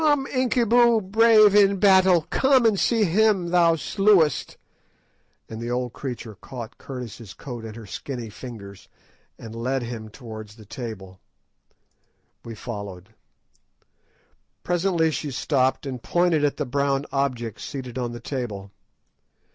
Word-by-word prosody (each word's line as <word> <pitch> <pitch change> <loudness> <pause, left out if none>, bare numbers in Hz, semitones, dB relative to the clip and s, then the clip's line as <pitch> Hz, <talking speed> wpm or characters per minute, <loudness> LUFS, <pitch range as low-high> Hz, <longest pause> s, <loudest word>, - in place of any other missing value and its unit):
_" - - -1
"Come, 290 -3 +3
Incubu, 240 -3 +3
brave 220 -2 +6
in 200 -1 +5
battle, 190 -3 +5
come 265 -2 +4
and 215 -4 +3
see 230 -2 +2
him 195 -1 +2
thou 170 -1 +4
slewest;" 180 - +2 0.9
and 110 0 -8
the 120 - -4
old 125 0 -2
creature 120 -4 -6
caught 120 +3 -9
Curtis' 120 -5 -8
coat 120 -4 -8
in 110 -1 -8
her 115 -2 -10
skinny 120 +1 -6
fingers, 100 -4 -10 0.5
and 115 -1 -10
led 125 +3 -2
him 115 -2 -6
away 110 - -13
towards 110 -3 -10
the 110 -2 -15
table. 100 -6 -8 1.2
We 115 -1 -8
followed. 100 -5 -7 1.5
Presently 175 -2 +1
she 145 +1 -3
stopped 130 0 0
and 130 -3 -5
pointed 175 -1 +1
at 145 - +1
the - - -2
brown 140 +1 0
object 125 -6 -2
seated 130 -3 -6
on 120 -1 -2
the 120 - -7
table. 115 -7 -5
135 Hz, 140 wpm, -24 LUFS, 115-185 Hz, 1.5 s, brave